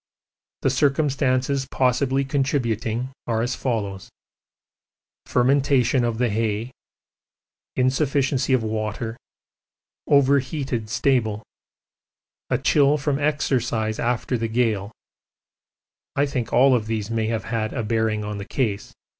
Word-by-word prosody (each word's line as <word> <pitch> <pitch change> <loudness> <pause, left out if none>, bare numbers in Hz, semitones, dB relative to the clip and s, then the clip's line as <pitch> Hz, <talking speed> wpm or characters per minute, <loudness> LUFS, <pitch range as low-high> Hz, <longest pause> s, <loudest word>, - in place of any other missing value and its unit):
The 135 - +3
circumstances 135 -1 +1
possibly 135 +1 +1
contributing 130 -4 -1 0.2
are 115 -1 0
as 120 +2 -1
follows: 100 -6 -3 1.2
fermentation 130 0 +3
of 115 -2 -1
the 125 0 +1
hay, 110 +2 -1 1.0
insufficiency 135 0 +1
of 130 -3 +3
water, 110 +1 -3 0.9
overheated 135 -4 +2
stable, 115 -3 +1 1.1
a - - +2
chill 145 0 +3
from 145 -1 -1
exercise 120 -7 0
after 120 +1 -1
the 115 - -1
gale 110 -3 0 1.2
I 140 - +3
think 130 -5 -3
all 130 -1 +5
these 110 -1 -4
may 110 -1 0
have 110 -3 -2
had 110 -1 -2
a 120 - -3
bearing 110 -1 0
on 105 -1 -4
the 100 - -6
case. 110 -7 -2
125 Hz, 110 wpm, -23 LUFS, 110-135 Hz, 1.2 s, all